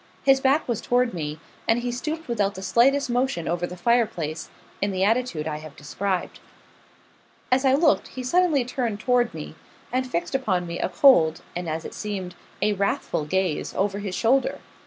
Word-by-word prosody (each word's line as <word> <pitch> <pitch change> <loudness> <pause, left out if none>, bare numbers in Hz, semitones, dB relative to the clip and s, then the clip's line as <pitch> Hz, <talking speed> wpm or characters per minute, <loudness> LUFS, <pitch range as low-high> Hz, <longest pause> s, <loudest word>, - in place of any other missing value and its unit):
His 270 -1 +5
back 275 +4 +2
was 235 -4 -1
toward 245 0 +1
me; 150 -3 -4 0.3
and 225 - +4
he 245 0 -2
stooped 310 +6 -4
without 205 -4 0
the 190 - -7
slightest 250 +9 +3
motion 245 -8 -1
over 175 +1 -1
the 180 - -9
fire 235 +5 +3
place, 160 -6 -5 0.3
in 200 - +1
the 190 -1 -1
attitude 220 -7 +1
I 150 -1 -2
have 155 -1 -11
described. 185 +5 -3 1.1
As 260 +2 +3
I 265 0 +5
looked, 300 +1 +3
he 255 - -7
suddenly 310 -1 +2
turned 235 -4 -2
toward 245 0 +2
me, 155 -1 -8 0.4
and 255 0 0
fixed 170 -5 -2
upon 205 -10 0
me 170 0 -5
a - - 0
cold, 165 - +5
and 175 -1 -3
as 160 +1 -3
it - - -7
seemed, 195 -4 -5 0.3
a 210 - +3
wrathful 200 -6 -1
gaze, 185 0 -1
over 200 +1 0
his 195 -3 -4
shoulder. 260 +6 +2
210 Hz, 185 wpm, -24 LUFS, 175-255 Hz, 1.1 s, His